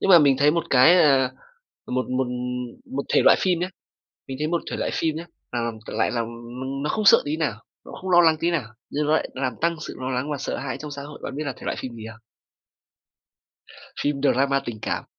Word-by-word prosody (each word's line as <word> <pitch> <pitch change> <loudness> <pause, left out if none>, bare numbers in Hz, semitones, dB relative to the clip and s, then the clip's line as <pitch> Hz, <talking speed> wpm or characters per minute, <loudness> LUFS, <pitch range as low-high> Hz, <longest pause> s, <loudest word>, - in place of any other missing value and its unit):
Nhưng 195 - +2
mà 175 - +10
mình 140 -3 +4
thấy 145 +1 +5
một 170 +1 0
cái, 155 +8 +7
à, 135 -3 +4 0.6
một 130 0 -1
một 130 0 0 0.7
một - - -1
thể - - +5
loại - - +7
phim 180 -3 +1
nhá, 180 - -1 0.6
mình 130 -1 -5
thấy 150 - 0
một 170 +1 0
thể - - -3
loại - - -1
phim 160 -2 0
nhá 165 - -5 0.3
là, 120 - -1
ừm, 110 -2 -5
lại - - 0
làm, 115 -2 -1
ừm, 125 +4 -6
nó 150 - -1
không 215 -1 -1
sợ - - +8
tí 150 +2 -2
nào! 150 -9 0 0.3
Nó - - -11
không 190 - -5
lo 175 -1 +7
lắng 160 -2 +5
tí 170 +1 +1
nào! 165 -6 0 0.3
Nhưng 150 +1 -1
nó 155 - +3
lại 160 - +1
nó 130 - -5
làm 130 -3 0
tăng 170 0 +2
sự - - -7
lo 130 0 -3
lắng 130 +4 -2
và 145 - -1
sợ - - -3
hãi 130 -2 -4
trong 150 -1 -8
xã 140 -1 -6
hội. 145 0 -10
Bạn 135 - -5
biết 155 - -3
là 135 - -2
thể - - -19
loại - - -2
phim 125 -2 -6
gì 110 - -9
không? 110 - -15 1.8
Phim 145 -1 0
drama 135 0 +3
tình 115 -2 -5
cảm. - - -2
140 Hz, 255 wpm, -24 LUFS, 130-160 Hz, 1.8 s, mà